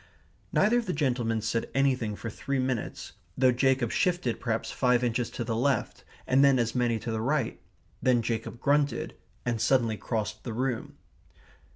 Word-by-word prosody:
Neither 230 +4 +4
of 235 - -5
the 180 - 0
gentlemen 120 -6 0
said 115 0 -1
anything 130 -6 +1
for 110 +3 -6
three 140 +4 -3
minutes, 130 -3 -2 0.3
though 130 -1 +5
Jacob 130 -1 +2
shifted 175 - 0
perhaps 115 -2 -2
five 125 -1 +2
inches 120 0 0
to 120 - -4
the 115 -1 -2
left, 130 0 0 0.2
and 130 +2 +4
then 140 -1 +5
as 115 -1 0
many 120 -2 +1
to 115 +1 -5
the 110 0 -2
right. 135 -1 -1 0.4
Then 125 -2 +3
Jacob 115 +1 -3
grunted, 140 -2 +1 0.3
and 115 -3 -1
suddenly 115 -3 +2
crossed 110 -2 -3
the 115 - -4
room. 125 0 -2
125 Hz, 170 wpm, -28 LUFS, 115-135 Hz, 0.4 s, though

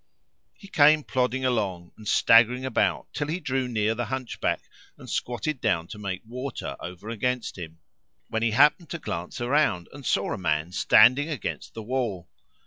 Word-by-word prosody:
He 200 - -14
came 150 -3 +5
plodding 130 0 -1
along 95 -8 -1
and 110 - -12
staggering 120 +5 +5
about 130 - 0
till 145 - -2
he 165 +4 -2
drew 130 -5 -1
near 110 -2 0
the 120 +1 -3
Hunchback 130 -1 -2 0.3
and - - -13
squatted 125 +4 -3
down 90 -8 0
to 105 - -8
make 100 0 -5
water[FN#505] 125 - -6
over 90 +5 -8
against 125 +2 -2
him; 80 -3 -9 0.5
when 110 - -2
he 115 - +2
happened 150 - +4
to 170 - -4
glance 85 - -5
around 120 - +1
and 140 0 -10
saw 100 -5 0
a - - -5
man 80 -1 -1
standing 125 - +5
against 150 -6 -5
the 110 - -6
wall. 110 -7 -3
120 Hz, 170 wpm, -26 LUFS, 100-130 Hz, 0.5 s, came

